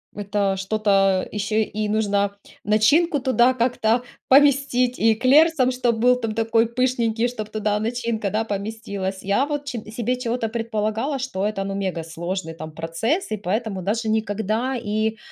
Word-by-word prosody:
это 200 Hz, -1 st, -1 dB
что-то 195 Hz, -1 st, +1 dB
ещё 210 Hz, +1 st, -2 dB
и 215 Hz, -1 st, -1 dB
нужно 200 Hz, -2 st, 0 dB, 0.3 s
начинку 285 Hz, -, +3 dB
туда 255 Hz, -1 st, +3 dB
как-то 240 Hz, -1 st, +1 dB, 0.2 s
поместить, 270 Hz, -3 st, +4 dB
и 225 Hz, 0 st, +4 dB
эклер 275 Hz, +8 st, +5 dB
сам 260 Hz, -5 st, +1 dB
чтоб 245 Hz, -2 st, 0 dB
был 250 Hz, +2 st, +4 dB
там 225 Hz, -3 st, -3 dB
такой 225 Hz, 0 st, +2 dB
пышненький, 235 Hz, -1 st, 0 dB
чтоб 215 Hz, -3 st, -6 dB
туда 210 Hz, -1 st, -1 dB
начинка, 230 Hz, -2 st, -2 dB
да, 215 Hz, +2 st, 0 dB
поместилась. 200 Hz, -2 st, -4 dB
Я 200 Hz, +8 st, +2 dB
вот 290 Hz, -1 st, -4 dB
че 250 Hz, -4 st, -4 dB
себе 245 Hz, +2 st, -2 dB
чего-то 230 Hz, -2 st, -2 dB
предполагала, 225 Hz, +4 st, -2 dB
что 205 Hz, -7 st, -3 dB
это, 195 Hz, -2 st, -3 dB
ну, 195 Hz, 0 st, -4 dB
мегасложный, 170 Hz, -1 st, -4 dB
там, 155 Hz, -1 st, -8 dB
процесс 165 Hz, -, -2 dB
и 215 Hz, -, -1 dB
поэтому 205 Hz, 0 st, -2 dB
даже 220 Hz, +4 st, -1 dB
никогда 220 Hz, +4 st, -1 dB
и, 220 Hz, -1 st, -1 dB
220 Hz, 155 wpm, -22 LUFS, 205-245 Hz, 0.3 s, эклер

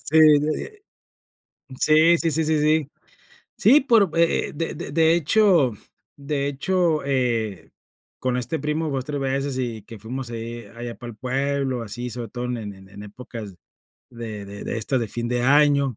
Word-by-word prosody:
Sí, 160 Hz, -, +2 dB, 0.4 s
eh. 425 Hz, -2 st, -7 dB, 1.0 s
Sí, 160 Hz, +2 st, +5 dB
sí, 165 Hz, -1 st, 0 dB
sí, 160 Hz, +2 st, +1 dB
sí, 155 Hz, 0 st, +1 dB
sí. 155 Hz, -1 st, +2 dB, 0.7 s
Sí, 295 Hz, +4 st, +6 dB
por 225 Hz, -, +3 dB
eh 170 Hz, 0 st, +2 dB
eh, -, -, -7 dB
de 165 Hz, +2 st, -3 dB
de 145 Hz, -, -5 dB
de 160 Hz, +2 st, +4 dB
hecho 170 Hz, -, +3 dB, 0.5 s
de 140 Hz, 0 st, -2 dB
hecho, 165 Hz, +2 st, 0 dB
eh, 115 Hz, -10 st, -1 dB, 0.5 s
con 125 Hz, -1 st, -1 dB
este 125 Hz, +6 st, -2 dB
primo, 150 Hz, +2 st, -2 dB
2 135 Hz, -2 st, -3 dB
3 145 Hz, -1 st, -3 dB
veces 135 Hz, 0 st, -1 dB
y 120 Hz, -4 st, -3 dB
que 115 Hz, +2 st, -11 dB
fuimos 120 Hz, +4 st, -5 dB
ahí, 115 Hz, 0 st, -6 dB
allá 120 Hz, 0 st, -6 dB
para 120 Hz, -2 st, -9 dB
el -, -, -14 dB
pueblo, 135 Hz, 0 st, -1 dB
así 120 Hz, +3 st, -5 dB
sobre 120 Hz, 0 st, -5 dB
todo 120 Hz, +2 st, -5 dB
en 125 Hz, 0 st, -3 dB
en 100 Hz, -2 st, -9 dB
épocas 105 Hz, -2 st, -9 dB, 0.6 s
de 115 Hz, -4 st, -6 dB
de 100 Hz, +1 st, -6 dB
de 115 Hz, -, -2 dB
esto 120 Hz, +4 st, 0 dB
de 115 Hz, -, -2 dB
fin 120 Hz, +2 st, -1 dB
de 120 Hz, 0 st, +1 dB
año, 140 Hz, -2 st, +4 dB
130 Hz, 175 wpm, -23 LUFS, 115-155 Hz, 1.0 s, Sí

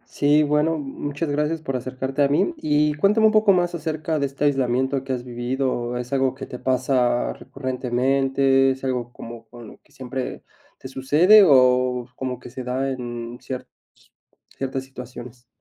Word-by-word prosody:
Sí, 145 Hz, +1 st, +4 dB
bueno, 150 Hz, +2 st, +1 dB
muchas 145 Hz, +2 st, -4 dB
gracias 150 Hz, +2 st, -1 dB
por 135 Hz, -3 st, -3 dB
acercarte 130 Hz, +2 st, -3 dB
a 140 Hz, -, +5 dB
mí. 145 Hz, -, +1 dB
Y 150 Hz, -, +1 dB
cuéntame 200 Hz, +8 st, +3 dB
un 215 Hz, -, +6 dB
poco 215 Hz, -1 st, +5 dB
más 175 Hz, -2 st, +1 dB
acerca 155 Hz, -1 st, -2 dB
de 140 Hz, -, 0 dB
este 140 Hz, +2 st, -3 dB
aislamiento 130 Hz, -1 st, +1 dB
que 135 Hz, -, -5 dB
has 125 Hz, -1 st, -4 dB
vivido, 125 Hz, 0 st, -2 dB
¿es 125 Hz, +2 st, -6 dB
algo 135 Hz, -1 st, +1 dB
que 135 Hz, -, -7 dB
te 125 Hz, -, -9 dB
pasa 125 Hz, -1 st, +1 dB
recurrentemente? 135 Hz, +1 st, +1 dB
¿Es 130 Hz, 0 st, -3 dB
algo 125 Hz, -2 st, -2 dB
como 115 Hz, -1 st, -10 dB
con 120 Hz, 0 st, -12 dB
lo -, -, -13 dB
que -, -, -31 dB
siempre 130 Hz, 0 st, -6 dB, 0.3 s
te -, -, -9 dB
sucede, 150 Hz, +11 st, +5 dB
o 125 Hz, -5 st, +4 dB
como 130 Hz, -1 st, -4 dB
que 125 Hz, -, -12 dB
se 130 Hz, +1 st, -6 dB
da 130 Hz, +2 st, -2 dB
en 120 Hz, -1 st, -6 dB
ciertas 130 Hz, -1 st, -6 dB, 0.9 s
ciertas 135 Hz, 0 st, -3 dB
situaciones? 125 Hz, -2 st, -11 dB
130 Hz, 170 wpm, -23 LUFS, 125-145 Hz, 0.9 s, un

